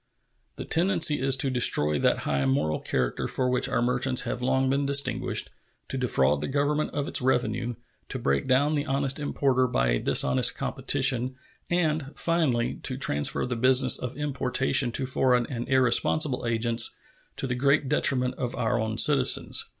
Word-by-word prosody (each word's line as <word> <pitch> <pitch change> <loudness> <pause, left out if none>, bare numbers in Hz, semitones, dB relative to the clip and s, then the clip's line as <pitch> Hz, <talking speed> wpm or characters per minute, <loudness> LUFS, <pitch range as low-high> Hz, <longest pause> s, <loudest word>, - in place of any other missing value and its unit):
The - - -8
tendency 165 -3 +1
is 135 0 +3
to 135 0 +2
destroy 75 - +2
that - - +1
high 70 -1 -1
moral 75 +3 -1
character 65 -2 -3
for 130 -1 -2
which 125 - 0
our - - -1
merchants 125 +1 +1
have 125 - -5
long 130 +1 0
been 140 +2 0
distinguished, 140 0 0 0.4
to - - -4
defraud 70 - +1
the - - -3
Government 145 +2 -1
of 145 0 -4
its - - -1
revenue, 120 -1 -1 0.3
to - - -4
break 70 - -1
down 140 +4 +2
the 145 0 -2
honest 135 0 -1
importer 135 -3 0
by 60 - 0
a - - 0
dishonest 65 -1 +3
competition, 130 -1 0 0.3
and, 155 -5 -1
finally, 150 -9 -1
to 130 - -1
transfer 75 - +1
the 125 0 -4
business 130 +2 +3
of 125 +2 -7
importation 135 -2 0
to 130 - 0
foreign 125 -1 +1
and 120 -1 -6
irresponsible 130 +1 +2
agents, 115 0 +1 0.4
to - - -4
the 125 - -2
great 140 +3 +1
detriment 130 -3 +1
of 125 -1 -4
our 120 0 -1
own 110 0 -3
citizens. 135 -2 +2
130 Hz, 165 wpm, -25 LUFS, 120-140 Hz, 0.4 s, is